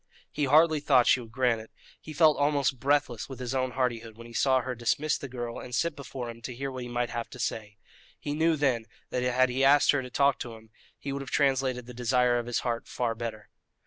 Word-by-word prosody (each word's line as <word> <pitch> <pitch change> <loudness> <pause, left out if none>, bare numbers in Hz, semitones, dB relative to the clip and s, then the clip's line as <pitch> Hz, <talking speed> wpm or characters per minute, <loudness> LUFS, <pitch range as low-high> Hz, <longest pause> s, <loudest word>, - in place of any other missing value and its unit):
He 150 - -1
hardly 155 +3 +5
thought 130 -4 +4
she - - +4
would 115 -2 -10
grant 120 -2 +1
it; 110 - -13 0.3
he 155 - -9
felt 155 -1 +5
almost 145 -3 +1
breathless 140 -4 0
with 130 -2 -8
his 125 0 -4
own 130 -1 -1
hardihood 115 -3 -2
when 115 - -11
he 120 - -12
saw 130 +1 +3
her 130 +1 -4
dismiss 135 +6 0
the 140 - -6
girl 120 -2 -5
and 125 -1 -6
sit 170 +3 0
before 130 -3 -6
him 115 0 -13
to 125 +1 -6
hear 135 +2 -4
what 130 -1 -6
he 120 - -6
might 120 0 -2
have 120 -1 -4
to - - -11
say. 105 -3 -4 0.4
He 145 - -4
knew 160 +2 +2
then 130 -6 0 0.2
that 125 - -1
had 125 +1 +2
he 130 +2 0
asked 145 +2 +6
her 145 - 0
to 125 - -8
talk 140 +1 +2
to 115 -2 -6
him 110 0 -17 0.3
he 140 - -5
would 140 - -4
have 135 - -7
translated 130 -3 +1
the 125 - -10
desire 125 0 +2
of 120 - -6
his 120 - -1
heart 120 -2 -3
far 120 -2 -1
better. 115 -2 -6
125 Hz, 245 wpm, -28 LUFS, 120-140 Hz, 0.4 s, asked